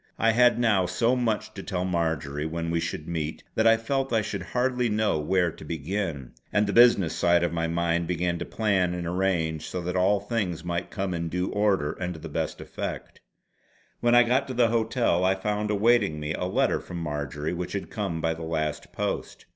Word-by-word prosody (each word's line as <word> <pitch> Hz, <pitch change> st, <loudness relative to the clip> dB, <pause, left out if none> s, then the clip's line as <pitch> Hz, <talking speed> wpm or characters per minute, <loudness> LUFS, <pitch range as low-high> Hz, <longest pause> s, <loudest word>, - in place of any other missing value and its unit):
I 115 Hz, -, +3 dB
had 120 Hz, +1 st, +5 dB
now 105 Hz, -6 st, +3 dB
so 115 Hz, +7 st, +2 dB
much 110 Hz, -3 st, -1 dB
to 95 Hz, -, -7 dB
tell 90 Hz, -2 st, -2 dB
Marjory 80 Hz, -5 st, -1 dB
when 85 Hz, +1 st, -3 dB
we 85 Hz, -, +1 dB
should 80 Hz, -1 st, -4 dB
meet 80 Hz, -2 st, -3 dB
that 110 Hz, -, +3 dB
I 115 Hz, 0 st, +6 dB
felt 135 Hz, +3 st, -1 dB
I 110 Hz, -2 st, +2 dB
should 105 Hz, -2 st, -4 dB
hardly 125 Hz, +4 st, 0 dB
know 105 Hz, -6 st, +1 dB
where 90 Hz, +2 st, +1 dB
to -, -, -13 dB
begin, 80 Hz, -3 st, -3 dB, 0.2 s
and 105 Hz, 0 st, +3 dB
the 100 Hz, -, -2 dB
business 115 Hz, -8 st, +5 dB
side 85 Hz, 0 st, +3 dB
of 85 Hz, -1 st, 0 dB
my 85 Hz, 0 st, 0 dB
mind 85 Hz, 0 st, 0 dB
began 85 Hz, 0 st, -1 dB
to -, -, -3 dB
plan 95 Hz, -5 st, +1 dB
and 90 Hz, -1 st, -4 dB
arrange 85 Hz, -3 st, -1 dB
so 90 Hz, -, -3 dB
that 90 Hz, +1 st, -3 dB
all 95 Hz, +3 st, +3 dB
things 100 Hz, -6 st, -2 dB
might 85 Hz, 0 st, -2 dB
come 95 Hz, -1 st, -3 dB
in 85 Hz, -1 st, -2 dB
due 90 Hz, +2 st, -2 dB
order 100 Hz, -8 st, +1 dB
and 90 Hz, -1 st, -4 dB
to -, -, -9 dB
the -, -, -8 dB
best -, -, -3 dB
effect. -, -, -6 dB, 0.8 s
When 120 Hz, 0 st, +3 dB
I 120 Hz, -, +8 dB
got 130 Hz, +3 st, +1 dB
to 130 Hz, -, -5 dB
the 120 Hz, -1 st, +4 dB
hotel 115 Hz, -5 st, +1 dB
I 95 Hz, +1 st, +3 dB
found 105 Hz, +2 st, -2 dB
awaiting 105 Hz, -6 st, +3 dB
me 75 Hz, +1 st, -3 dB
a 90 Hz, -, -2 dB
letter 90 Hz, -, +1 dB
from 90 Hz, -, -8 dB
Marjory 75 Hz, -1 st, -3 dB
which 90 Hz, 0 st, -4 dB
had 100 Hz, -, -4 dB
come 95 Hz, -7 st, -3 dB
by 80 Hz, 0 st, +1 dB
the 80 Hz, -, -9 dB
last 80 Hz, -2 st, -3 dB
post. -, -, -4 dB
90 Hz, 210 wpm, -26 LUFS, 85-110 Hz, 0.8 s, I